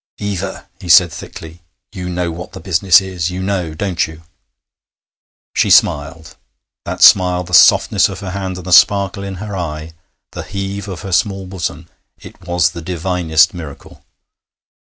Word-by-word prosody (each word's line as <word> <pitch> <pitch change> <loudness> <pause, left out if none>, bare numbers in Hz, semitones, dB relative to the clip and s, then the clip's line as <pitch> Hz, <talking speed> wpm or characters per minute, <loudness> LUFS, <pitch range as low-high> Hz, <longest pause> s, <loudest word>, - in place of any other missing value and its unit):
'Eva,' 100 -2 -5
he 90 -3 -10
said 85 0 +6
thickly, 80 +1 -11 0.3
'you 90 -1 -6
know 90 -1 -2
what 90 +2 -9
the - - -9
business 95 -1 +3
is; 90 -3 -4
you 90 +1 -6
know, 95 -4 -3
don't 90 0 -1
you?' 80 +1 -13 1.3
She - - +1
smiled. 80 +2 +1 0.5
That - - -2
smile, 90 -2 +5
the 90 +1 -12
softness - - +5
of 95 0 -8
her 95 -2 -6
hand, 95 -1 -5
the 90 0 -7
sparkle 100 +2 +4
in 100 -1 -6
her 100 +2 -7
eye, 80 -2 -6 0.4
the - - -7
heave 100 +1 -6
of 95 -3 -7
her 95 -1 -7
small 95 0 0
bosom... 85 -3 -6 0.3
it - - -15
was 85 -2 +1
the 85 - -8
divinest 85 -2 +1
miracle! 80 -6 -11
90 Hz, 155 wpm, -16 LUFS, 85-95 Hz, 1.3 s, said